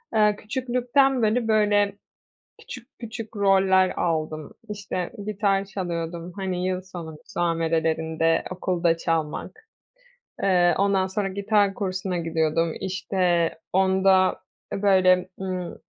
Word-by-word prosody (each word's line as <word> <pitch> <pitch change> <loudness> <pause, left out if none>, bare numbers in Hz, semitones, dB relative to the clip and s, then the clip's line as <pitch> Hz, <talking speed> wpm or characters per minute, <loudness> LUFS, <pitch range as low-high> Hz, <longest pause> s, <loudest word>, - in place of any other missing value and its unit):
Eee, 210 -1 +4
küçüklükten 250 +3 +1
beri, 225 +1 +1
böyle, 205 -2 +3 0.7
küçük 250 -1 -10
küçük 225 -1 -7
roller 190 -2 +4
aldım. 155 -2 -2 0.2
İşte, 195 -3 -4
gitar 200 -2 +1
çalıyordum, 170 -3 -5
hani, 185 -2 -2
yıl 185 0 -1
sonu 175 -4 -8
müsamerelerinde 165 -1 0
okulda 175 -2 0
çalmak. 165 - -3 0.8
Eee, 180 -2 +4
ondan 195 -1 +2
sonra 195 +1 -2
gitar 200 +1 +1
kursuna 185 -2 -2
gidiyordum. 165 0 0
İşte, 180 -2 0 0.2
onda, 190 0 +3 0.3
e, 195 - -4
böyle, 185 -2 +4
ımm, 185 -2 -4
190 Hz, 105 wpm, -24 LUFS, 170-205 Hz, 0.8 s, Eee